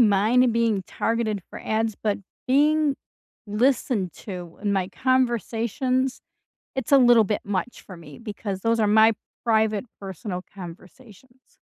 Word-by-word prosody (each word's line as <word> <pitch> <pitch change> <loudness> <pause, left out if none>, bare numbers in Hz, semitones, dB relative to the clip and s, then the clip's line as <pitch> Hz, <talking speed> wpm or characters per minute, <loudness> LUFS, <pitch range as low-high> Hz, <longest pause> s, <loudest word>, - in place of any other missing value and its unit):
mind 225 +3 +4
being 225 -4 +1
targeted 220 0 -1
for - - -9
ads, 220 0 0
but 205 0 -1 0.3
being 295 +1 +3 0.5
listened 215 - +1
to 180 -4 -8
in 205 -1 0
my 190 -2 0
conversations, 255 - 0 0.6
it's 265 +1 -3
a - - +9
little 240 -3 +6
bit 205 +1 -1
much 205 +4 -3
for 185 - -10
me 150 0 -13
because 205 -3 -5
those 230 +2 +1
are 215 - +3
my 220 +2 +6 0.3
private, 220 -1 +2 0.2
personal 190 -1 -5
conversations. 210 +7 -13
220 Hz, 135 wpm, -24 LUFS, 200-245 Hz, 0.6 s, a